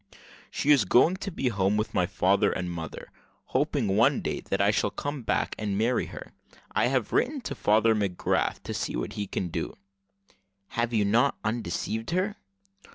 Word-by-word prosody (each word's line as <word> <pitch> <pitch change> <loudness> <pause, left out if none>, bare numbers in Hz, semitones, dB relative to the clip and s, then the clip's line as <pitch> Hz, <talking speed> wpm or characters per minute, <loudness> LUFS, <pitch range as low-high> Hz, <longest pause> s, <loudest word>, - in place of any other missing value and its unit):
"She 150 - +1
is 140 -6 +6
going 120 - +5
home 185 - -4
to 195 +1 -5
be 135 -7 -1
with 105 +2 0
my 90 -1 +2
father 95 +1 +2
and 90 -1 -3
mother, 80 -2 -7 0.4
hoping 140 -3 +1
one 100 +3 +4
day - - -2
that - - -3
I - - +4
shall - - +1
come 145 -1 -4
back 115 - 0
and 105 -2 -1
marry 115 +4 +1
her. - - -9 0.4
I - - +2
have 130 -3 0
written 285 +3 +1
to 155 - -4
Father 110 -2 +3
McGrath 100 -4 0
to - - -5
see - - -3
what - - -3
he 100 -1 -4
can 90 -1 -3
do." - - -4 0.9
"Have 120 0 -1
you 110 -3 +2
then 100 - 0
not 120 +5 +3
undeceived 110 0 -2
her?" 185 +5 0
110 Hz, 185 wpm, -27 LUFS, 100-135 Hz, 0.9 s, is